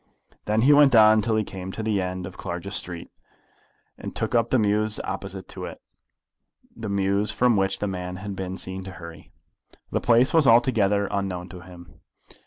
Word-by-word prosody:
Then 105 Hz, +1 st, +1 dB
he 145 Hz, +3 st, +6 dB
went 145 Hz, -3 st, +6 dB
on 110 Hz, 0 st, +6 dB
till 110 Hz, +1 st, 0 dB
he 110 Hz, -, +1 dB
came 95 Hz, -1 st, -7 dB
to 110 Hz, -, -5 dB
the 105 Hz, -3 st, 0 dB
end 90 Hz, 0 st, -4 dB
of 90 Hz, +1 st, -9 dB
Clarges 95 Hz, +2 st, -6 dB
Street, 85 Hz, -2 st, -3 dB, 0.9 s
and -, -, -6 dB
looked -, -, -2 dB
up 115 Hz, -1 st, +2 dB
the 130 Hz, -, +3 dB
mews 105 Hz, 0 st, +1 dB
opposite 95 Hz, -1 st, -6 dB
to -, -, -7 dB
it, -, -, -9 dB, 1.0 s
the 110 Hz, -2 st, -6 dB
mews 100 Hz, +1 st, +1 dB
from 125 Hz, -2 st, +2 dB
which 95 Hz, -1 st, 0 dB
the 105 Hz, -, -2 dB
man 90 Hz, -1 st, -5 dB
had 100 Hz, +1 st, -6 dB
been 95 Hz, 0 st, -5 dB
seen 95 Hz, 0 st, -5 dB
to 95 Hz, -, -8 dB
hurry. 85 Hz, -3 st, -12 dB, 0.6 s
The -, -, -1 dB
place 120 Hz, +2 st, +3 dB
was 160 Hz, -4 st, +4 dB
altogether 105 Hz, -4 st, +3 dB
unknown 95 Hz, -3 st, -3 dB
to 90 Hz, -, -10 dB
him. 85 Hz, 0 st, -14 dB
100 Hz, 190 wpm, -24 LUFS, 95-110 Hz, 1.0 s, he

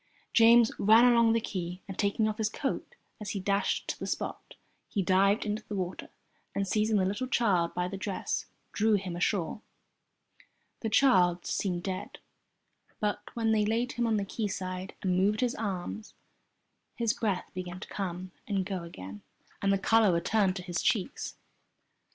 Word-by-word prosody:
James 230 Hz, 0 st, +7 dB
ran 220 Hz, +4 st, +7 dB
along 235 Hz, -2 st, +5 dB
the 230 Hz, -, +3 dB
quay, 180 Hz, -4 st, -5 dB
and 195 Hz, -, -6 dB
taking 205 Hz, +2 st, +1 dB
off 215 Hz, +1 st, -3 dB
his 215 Hz, -1 st, +1 dB
coat 270 Hz, +5 st, -4 dB, 0.2 s
as 210 Hz, -2 st, -6 dB
he -, -, -2 dB
dashed 200 Hz, +1 st, 0 dB
to -, -, -3 dB
the -, -, -4 dB
spot, -, -, -4 dB, 0.3 s
he 200 Hz, -, 0 dB
dived 195 Hz, +4 st, +3 dB
into 210 Hz, +1 st, -2 dB
the 210 Hz, -, -4 dB
water 185 Hz, -1 st, -4 dB, 0.5 s
and, 200 Hz, 0 st, 0 dB
seizing 215 Hz, +2 st, +2 dB
the 190 Hz, -, +2 dB
little 205 Hz, +7 st, -2 dB
child 195 Hz, -9 st, +1 dB
by 180 Hz, 0 st, 0 dB
the 195 Hz, +2 st, -5 dB
dress, 190 Hz, 0 st, -3 dB, 0.2 s
drew 215 Hz, 0 st, +3 dB
him 185 Hz, -3 st, -3 dB
ashore. 180 Hz, +2 st, -1 dB, 1.2 s
The 225 Hz, -, -2 dB
child 185 Hz, -8 st, +4 dB
seemed 175 Hz, -3 st, -1 dB
dead, 185 Hz, -1 st, -4 dB, 0.8 s
but 210 Hz, -1 st, -1 dB
when 225 Hz, -1 st, +1 dB
they 215 Hz, -1 st, +3 dB
laid 230 Hz, +4 st, 0 dB
him 240 Hz, -1 st, -1 dB
on 220 Hz, -1 st, +2 dB
the 200 Hz, -, -1 dB
quayside, 190 Hz, -3 st, -4 dB
and 185 Hz, -2 st, +1 dB
moved 200 Hz, +5 st, +2 dB
his 250 Hz, -1 st, +1 dB
arms, 210 Hz, +1 st, -4 dB, 0.8 s
his 230 Hz, -2 st, +1 dB
breath 200 Hz, -5 st, -2 dB
began 180 Hz, 0 st, -6 dB
to -, -, -8 dB
come 185 Hz, -1 st, -4 dB, 0.2 s
and 195 Hz, -3 st, 0 dB
go 190 Hz, -2 st, -3 dB
again 100 Hz, -, -9 dB, 0.4 s
and 195 Hz, -, +2 dB
the 195 Hz, -, +3 dB
colour 220 Hz, +1 st, +4 dB
returned 185 Hz, +3 st, +2 dB
to 180 Hz, -, -5 dB
his 175 Hz, -2 st, -2 dB
cheeks. 230 Hz, +4 st, -1 dB
200 Hz, 170 wpm, -30 LUFS, 185-220 Hz, 1.2 s, James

